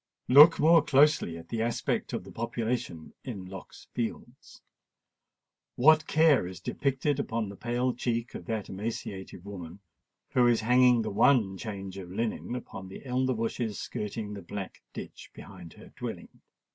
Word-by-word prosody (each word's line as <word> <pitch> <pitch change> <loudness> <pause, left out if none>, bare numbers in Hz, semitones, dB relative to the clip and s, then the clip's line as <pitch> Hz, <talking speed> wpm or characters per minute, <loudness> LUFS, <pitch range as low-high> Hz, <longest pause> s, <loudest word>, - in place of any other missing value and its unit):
Look 150 +6 +8
more 165 +2 +6
closely 140 - +3
at 85 0 -12
the 115 - -2
aspect 115 +1 -1
of - - -3
the 95 - -12
population 115 -6 -3
in 105 -8 -6
Lock's 95 0 -11
Fields. 115 -2 -6 1.1
What 155 +4 +5
care 155 - +4
is 90 -1 -8
depicted 140 +7 -1
upon 115 -6 -2
the 100 - -9
pale 120 +3 -1
cheek 120 -1 -2
of 85 - -8
that 110 -3 -3
emaciated 95 -2 -6
woman 95 -2 -8 0.5
who 125 -1 +4
is 120 -2 +3
hanging 125 0 +4
the 110 - -3
one 105 -2 +3
change 100 -2 -6
of 90 -2 -9
linen 115 +4 -3
upon 95 -6 -7
the 95 - -11
elder 130 0 0
bushes 115 -1 -2
skirting 105 0 -5
the 100 - -7
black 95 +2 -7
ditch - - -9
behind 85 -2 -11
her - - -14
dwelling! - - -7
115 Hz, 155 wpm, -29 LUFS, 95-125 Hz, 1.1 s, Look